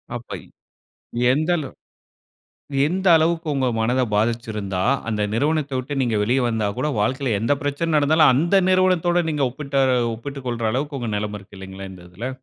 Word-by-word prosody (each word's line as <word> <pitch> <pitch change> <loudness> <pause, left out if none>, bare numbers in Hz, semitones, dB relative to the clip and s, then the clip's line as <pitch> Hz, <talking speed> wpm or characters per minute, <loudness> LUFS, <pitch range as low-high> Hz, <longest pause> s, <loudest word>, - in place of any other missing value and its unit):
அப்ப 120 0 -6 0.9
எந்தளவ் 155 +1 0 1.1
எந்த 185 +4 -2
அளவுக்கு 165 +1 +1
உங்க 130 -2 +1
மனதை 125 +3 +1
பாதிச்சிருந்தா, 105 -4 -1 0.3
அந்த 105 -2 -1
நிறுவனத்தை 145 +1 0
விட்டு 130 +3 -4
நீங்க 120 -3 0
வெளியே 125 +5 +1
வந்தா 110 -3 0
கூட, 130 - 0
வாழ்க்கையில 130 +1 0
எந்த 115 +6 +2
பிரச்சனை 145 +4 -2
நடந்தாலும், 150 -1 +5
அந்த 170 +8 +3
நிறுவனத்தோடு 180 -2 +3
நீங்க 150 -3 0
ஒப்பிட்ட 140 +1 -6 0.4
ஒப்பிட்டுக் 135 +3 -8
கொள்ற 120 -1 -3
அளவுக்கு 140 +2 -2
உங்க 115 -2 -3
நிலைமை 105 0 -3
இருக்கு 100 0 -16
இல்லைங்களா 95 0 -8
இந்த 90 -2 -13
இதுல? 110 +8 -5
130 Hz, 150 wpm, -22 LUFS, 110-155 Hz, 1.1 s, நடந்தாலும்